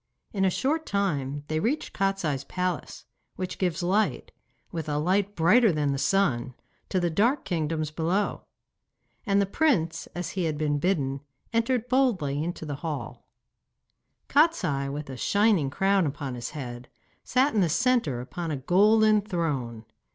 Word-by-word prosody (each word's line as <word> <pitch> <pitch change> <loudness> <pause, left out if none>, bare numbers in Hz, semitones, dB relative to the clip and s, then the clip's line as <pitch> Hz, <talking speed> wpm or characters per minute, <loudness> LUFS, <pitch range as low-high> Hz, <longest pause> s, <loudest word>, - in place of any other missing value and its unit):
In 195 -2 0
a 190 - +4
short 300 - -1
time 145 -8 -1
they 155 0 -1
reached 250 - -1
Kostiei's 195 -9 -1
palace, 180 -1 -4 0.3
which 185 0 -5
gives 180 -1 0
light, 200 +5 0 0.4
with 160 -3 -4
a 145 - 0
light 190 +6 +1
brighter 210 +7 +5
than 150 -3 0
the 140 - -2
sun, 135 -7 +1 0.3
to 185 - +1
the 175 -1 0
dark 235 - +2
kingdoms 155 -3 -2
below. 175 +6 -1 0.8
And 200 0 +3
the 200 - +3
prince, 190 - +1
as 175 0 -4
he 185 -3 -2
had 155 -2 -1
been 145 -1 0
bidden, 140 -6 0 0.3
entered 230 +1 +1
boldly 195 - +1
into 170 -1 -4
the 145 -2 -4
hall. 150 -1 -6 1.0
Kostiei, 185 - +2
with 150 +1 -5
a 130 -1 -7
shining 200 - +2
crown 195 +3 +2
upon 140 -2 -4
his 120 -1 -5
head, 125 -2 -7 0.3
sat 260 +4 +2
in 210 - +3
the 175 - +2
centre 225 - +1
upon 165 +7 -5
a 150 - -2
golden 210 - +4
throne. 145 - -3
175 Hz, 155 wpm, -27 LUFS, 145-205 Hz, 1.0 s, brighter